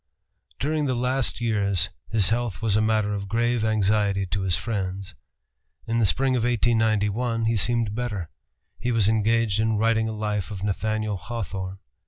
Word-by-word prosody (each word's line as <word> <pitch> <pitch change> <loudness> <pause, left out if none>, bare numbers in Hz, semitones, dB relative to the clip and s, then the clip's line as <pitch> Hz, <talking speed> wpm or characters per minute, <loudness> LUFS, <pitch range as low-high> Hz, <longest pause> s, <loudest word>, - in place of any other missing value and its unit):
During 150 +1 0
the 130 - 0
last 125 +1 0
years 100 -5 +1 0.2
his 105 -4 +2
health 120 -2 -1
was 110 -3 +1
a 110 - +3
matter 110 -1 +1
of 100 -1 -4
grave 120 +2 +1
anxiety 105 -2 +2
to 95 +2 -2
his 95 -2 +2
friends. 95 0 -3 0.7
In 115 +1 0
the 110 - +4
spring 130 +4 +2
of 120 - +1
1891 115 -1 +1
he 115 +1 +2
seemed 115 0 +1
better. 105 -8 -4 0.5
He 125 +2 -1
was 110 -4 +3
engaged 110 -1 +2
in 110 -1 +1
writing 110 0 +2
a - - -4
life 105 -2 -2
of 100 -2 -6
Nathaniel 110 +1 -1
Hawthorne. 95 -3 -5
110 Hz, 165 wpm, -25 LUFS, 100-115 Hz, 0.7 s, the